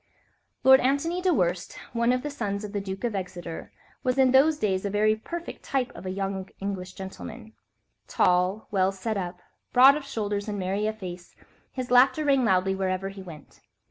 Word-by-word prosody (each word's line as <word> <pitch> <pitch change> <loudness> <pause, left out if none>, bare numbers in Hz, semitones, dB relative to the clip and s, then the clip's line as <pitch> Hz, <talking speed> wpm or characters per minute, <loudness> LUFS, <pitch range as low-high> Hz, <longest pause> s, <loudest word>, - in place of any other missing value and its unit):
Lord 265 +1 +8
Antony 285 +7 0
Dewhurst, 185 - 0 0.2
one 235 +1 +2
of 250 0 0
the 295 - -3
sons 205 -7 -3
of 210 0 -7
the 205 - -1
Duke 195 +1 -6
of 235 -2 -1
Exeter, 180 -3 -6 0.3
was 255 0 0
in 260 -1 +5
those 290 +4 +5
days 190 -7 0
a 200 - -1
very 215 +2 +2
perfect 340 +10 -7
type 265 -3 -1
of 175 +2 -9
a - - -2
young 195 0 -3
English 190 -2 -4
gentleman—tall, 190 -2 -3
well 190 -1 +2
set 205 +3 -3
up, 180 -2 -5 0.3
broad 265 +3 +8
of 300 - -4
shoulders 205 -6 -3
and 210 -1 -3
merry 195 +3 -1
of 215 0 -3
face, 180 -3 -8 0.4
his 255 -2 -5
laughter 265 +5 +5
rang 275 -2 +3
loudly 190 -3 +2
wherever 190 0 -2
he 195 0 -9
went. 165 -6 -12
205 Hz, 180 wpm, -26 LUFS, 190-255 Hz, 0.4 s, Lord